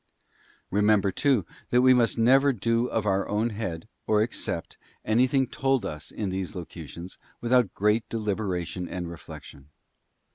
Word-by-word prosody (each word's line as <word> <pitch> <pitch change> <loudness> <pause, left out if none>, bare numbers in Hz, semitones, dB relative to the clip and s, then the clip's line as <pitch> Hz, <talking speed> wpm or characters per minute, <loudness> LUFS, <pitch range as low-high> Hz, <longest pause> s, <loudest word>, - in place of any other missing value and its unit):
Remember, 105 -1 +3
too, 130 - +2 0.2
that 125 +1 +4
we 130 0 +7
must 120 -2 +2
never 135 +5 +5
do 115 +1 0
of 110 -3 -1
our 95 -1 +1
own 110 +3 0
head, 100 -4 -5 0.2
or 105 -1 +4
accept, 115 - -4 0.3
anything 130 +4 +3
told 135 +1 0
us 75 0 -6
in 105 -3 -4
these 95 +1 -4
locutions, 85 0 -8 0.2
without 120 -4 +2
great 105 +3 +1
deliberation 95 -5 -2
and 90 -2 -5
reflection. 75 -3 -11
105 Hz, 140 wpm, -26 LUFS, 95-120 Hz, 0.3 s, we